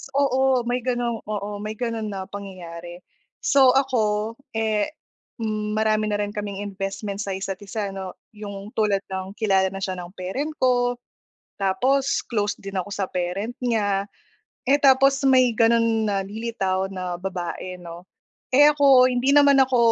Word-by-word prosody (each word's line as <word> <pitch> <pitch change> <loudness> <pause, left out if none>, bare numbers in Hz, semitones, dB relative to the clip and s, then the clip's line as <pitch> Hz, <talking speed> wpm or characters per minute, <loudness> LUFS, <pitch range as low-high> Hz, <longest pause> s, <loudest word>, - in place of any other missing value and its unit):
Oo, 265 -2 +3
may 245 +1 -1
gano'ng 240 -2 -1
oo, 205 -1 -4
may 215 +1 -5
ganon 230 -1 -3
na 195 -2 -4
pangyayari. 175 -3 -9 0.4
So, 265 -3 +5
ako 225 -5 +1 0.2
eh, 220 -2 +1 0.5
hmm, 215 -1 -2
marami 215 0 +1
na 205 -1 -1
rin 205 - -4
kaming 205 -1 -5
investment 195 0 -5
sa 200 -2 -3
isa't-isa 195 +2 -4
'no. 190 -1 -7 0.2
'Yong 205 -1 -8
tulad 205 -3 +1
ng 190 +1 -5
kilala 195 -4 +2
na 195 +1 -6
siya 185 -1 -3
ng 175 0 -9
parent 225 +12 -3
ko, 245 -2 +2 0.7
tapos 260 +8 +1
close 210 -2 -1
din 195 0 -8
ako 185 +2 -4
sa 200 -1 -2
parent 185 +6 -3
niya, 205 -5 0 0.6
eh 280 - +6
tapos 275 0 +4
may 260 -2 +5
ganon 230 -1 +3
na 200 -1 0
lilitaw 195 -3 -2
na 180 -2 -4
babae 180 0 -5
'no. 170 0 -10 0.5
Eh 290 +3 +8
ako, 275 -3 +5
hindi 255 +3 +2
naman 285 -1 +6
ako 260 -2 +4
210 Hz, 150 wpm, -23 LUFS, 195-245 Hz, 0.7 s, Eh